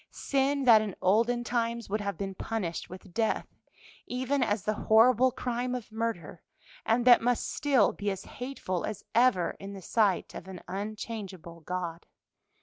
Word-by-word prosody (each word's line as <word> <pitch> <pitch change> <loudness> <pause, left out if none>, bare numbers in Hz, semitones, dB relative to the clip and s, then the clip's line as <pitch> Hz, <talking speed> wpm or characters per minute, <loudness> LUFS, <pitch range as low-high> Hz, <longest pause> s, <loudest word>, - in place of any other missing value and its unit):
sin 275 0 0
that 230 -4 +7
in 210 -4 -4
olden 235 +5 +2
times 235 -1 -1
would 210 +2 -1
have 200 -1 -3
been 195 -1 -4
punished 190 -3 -4
with 185 0 -11
death, 225 -1 0 0.6
even 260 +2 -1
as 210 -5 0
the 215 - 0 0.2
horrible 245 +3 +6
crime 245 0 -2
of 235 -3 -7
murder, 220 -8 -4 0.5
and 235 +2 +2
that 245 -1 +8
must 245 0 0
still 275 -8 +3
be 205 0 -3
as 195 -1 -4
hateful 245 -9 -4
as 215 - -5
ever 230 -8 +3
in 195 +1 -7
the 195 - -8
sight 205 -1 +1
of 185 - -8
an 190 -2 -8
unchangeable 195 -3 -6
God. 175 0 -5
220 Hz, 160 wpm, -29 LUFS, 190-245 Hz, 0.6 s, that